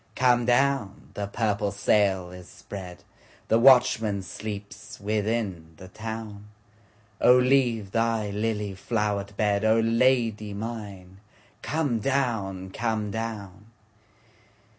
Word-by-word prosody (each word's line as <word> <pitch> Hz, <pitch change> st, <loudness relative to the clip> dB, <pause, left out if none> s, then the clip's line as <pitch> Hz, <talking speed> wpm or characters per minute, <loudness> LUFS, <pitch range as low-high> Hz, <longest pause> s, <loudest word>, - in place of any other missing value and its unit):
Come 120 Hz, -1 st, +3 dB
down! 125 Hz, -5 st, +1 dB
the 100 Hz, -1 st, -4 dB
purple 105 Hz, -1 st, -1 dB
sail 100 Hz, -3 st, +1 dB
is 90 Hz, 0 st, -11 dB
spread, 95 Hz, -3 st, -9 dB, 0.5 s
The 115 Hz, -, +4 dB
watchman 115 Hz, -5 st, +4 dB
sleeps 100 Hz, 0 st, -8 dB
within 105 Hz, -5 st, -2 dB
the 95 Hz, -, -12 dB
town,O 105 Hz, +1 st, -2 dB
leave 125 Hz, -6 st, +2 dB
thy 115 Hz, -2 st, 0 dB
lily 105 Hz, -1 st, -2 dB
flowered 100 Hz, -1 st, -2 dB
bed,O 110 Hz, +2 st, +2 dB
Lady 115 Hz, -3 st, +1 dB
mine 100 Hz, -4 st, -7 dB, 0.4 s
come 145 Hz, -7 st, -1 dB
down, 105 Hz, -8 st, -1 dB
come 110 Hz, -1 st, -2 dB
down! 105 Hz, -3 st, -6 dB
105 Hz, 95 wpm, -26 LUFS, 100-115 Hz, 0.5 s, The